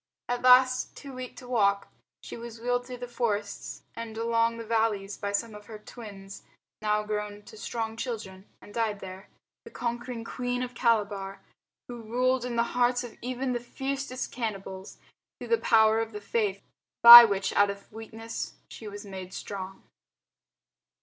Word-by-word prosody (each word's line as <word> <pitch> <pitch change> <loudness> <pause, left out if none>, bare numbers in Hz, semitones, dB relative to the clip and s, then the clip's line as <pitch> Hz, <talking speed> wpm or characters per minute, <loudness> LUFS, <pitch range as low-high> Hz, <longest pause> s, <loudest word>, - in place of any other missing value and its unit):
At 245 0 -2
last, 255 0 +5
too 275 -2 -9
weak 255 -1 -7
to 250 - -11
walk, 200 -5 +2 0.4
she - - -8
was 235 -1 -9
wheeled 245 +1 -1
through 250 -1 -7
the 245 0 -7
forests 210 -4 -3
and 225 -1 -7
along 230 0 +1
the 230 - -7
valleys 215 -3 0
by 200 - -4
some 220 +2 -2
of 210 0 -12
her 220 - -8
"twins" 200 -3 -11 0.4
now 210 0 +1
grown 210 -1 -4
to 220 - -13
strong 220 +1 -4
children, 210 -5 -6 0.2
and 205 - -14
died 220 -3 -1
there 190 +1 -10 0.3
the 460 - -11
conquering 240 - -4
Queen 245 +1 -3
of 250 0 -6
Calabar, 205 -5 0 0.5
who 240 -1 -8
ruled 250 +3 0
in 245 -1 -4
the 235 - +3
hearts 245 0 +2
of 240 - -9
even 255 +1 -2
the 240 - -1
fiercest 265 +1 -4
cannibals 195 -4 -5 0.4
through - - -9
the 465 -1 +3
power 220 -1 +4
of 225 -1 -3
the 210 - -5
Faith, 205 -2 -1 0.4
by 235 0 +14
which 200 -3 0
out 205 0 +4
of 200 0 -8
weakness 225 +1 -7 0.2
she 220 - -9
was 205 0 -8
made 190 -1 -8
strong. 190 -1 -7
225 Hz, 170 wpm, -28 LUFS, 205-245 Hz, 0.5 s, by